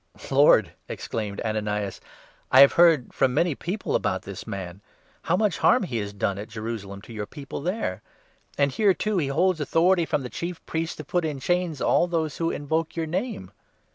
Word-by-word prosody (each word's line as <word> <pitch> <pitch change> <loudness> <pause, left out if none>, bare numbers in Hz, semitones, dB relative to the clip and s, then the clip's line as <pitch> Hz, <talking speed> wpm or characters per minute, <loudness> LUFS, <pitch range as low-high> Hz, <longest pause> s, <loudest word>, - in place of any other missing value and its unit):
" - - -11
Lord," 135 - +5 0.2
exclaimed 105 -3 -4
Ananias, 105 -3 -2 0.3
" - - -33
I 130 - +8
have 140 - +8
heard 165 -7 +4
from 130 -2 +1
many 175 0 +2
13 140 - -5
people 195 +4 -3
about - - 0
this - - -8
man 95 -1 -6 0.2
— - - -34
how 180 - +2
much 205 -4 +1
harm 250 - +4
he 130 -11 -3
has 100 -2 -3
done 100 -1 -2
at 105 - -7
Jerusalem 110 -3 -6
to 115 - -11
your 105 -1 -5
People 140 +2 -7
there. 170 - -2 0.6
And, 140 -1 +2
here, 195 +6 +3
too, 215 -3 0
he 145 - 0
holds 170 +5 +1
14 - - -4
authority 170 +4 +3
from 140 - 0
the 125 - -5
Chief 170 -1 -5
Priests 165 0 -3
to - - -7
put 175 -1 -1
in 150 -3 -3
chains 175 0 -1
all 175 - +3
those 160 -4 -2
who 165 0 0
invoke 160 +2 -2
your 165 -1 -1
Name." 160 - -4
145 Hz, 210 wpm, -25 LUFS, 110-175 Hz, 0.6 s, I